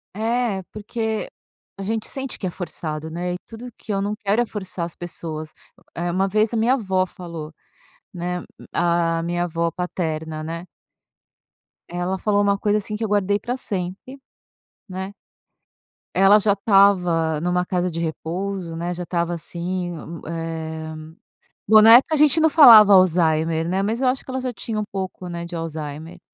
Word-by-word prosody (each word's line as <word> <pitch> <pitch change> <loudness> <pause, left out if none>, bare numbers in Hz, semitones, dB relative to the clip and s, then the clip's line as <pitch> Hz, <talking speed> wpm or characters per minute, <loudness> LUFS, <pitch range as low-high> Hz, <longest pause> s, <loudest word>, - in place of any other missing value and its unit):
É, 225 -2 0
porque 220 +1 -3 0.5
a 195 - -9
gente 220 +2 -2
sente 270 -2 -4
que - - -5
é 180 - -1
forçado, 160 -3 -5
né, 175 +2 -3
e - - -2
tudo 235 +2 -9
que 215 - -8
eu 195 - 0
não 205 +1 -1
quero 210 +3 +1
é - - -5
forçar 190 -5 -5
as 170 - -7
pessoas. 155 -2 -5 0.2
O - - -25
é 175 +1 -2
uma 190 +2 +1
vez 215 +3 +1
a - - 0
minha 230 +4 +3
avó 190 -7 0
falou, 170 -4 -8 0.6
né, 180 0 -3
hum, - - -11 0.3
a 170 -1 +1
minha 175 +1 -1
avó 170 0 -1
paterna, 160 -3 -4
né. 165 +2 -5 1.2
Ela 180 +2 -2
falou 205 +1 +1
uma 200 0 +2
coisa 205 +1 +1
assim, 210 0 -3
que 220 - -4
eu - - 0
guardei 205 0 +1
para 245 +5 -3
sempre, 195 +6 -5 0.7
né. 190 +1 -5 1.0
Ela 195 +3 +7
já 205 0 +3
estava 180 -6 +3
numa 180 +1 0
casa 180 0 -1
de 165 -1 -5
repouso, 170 +2 -4
né, 175 +2 -3
já 180 - -6
estava 170 -1 -1
assim, 175 +2 -4
m 165 +1 -8
eh, 160 -1 -5 0.7
bom, 215 +1 +8
na 225 +1 +9
época 310 +5 +1
a - - +1
gente 300 +1 +5
não 320 0 +5
falava 225 -10 +9
Alzheimer, 165 -3 +3
né, 190 +2 0
mas 225 +5 -1
eu 260 - +2
acho 255 +1 0
que - - -7
ela 260 0 -2
já 255 -1 -2
tinha 215 0 -4
um - - -1
pouco, 190 -2 -5
né, 170 0 -5
de 170 0 -7
Alzheimer. 160 +1 -6
185 Hz, 180 wpm, -22 LUFS, 170-210 Hz, 1.2 s, na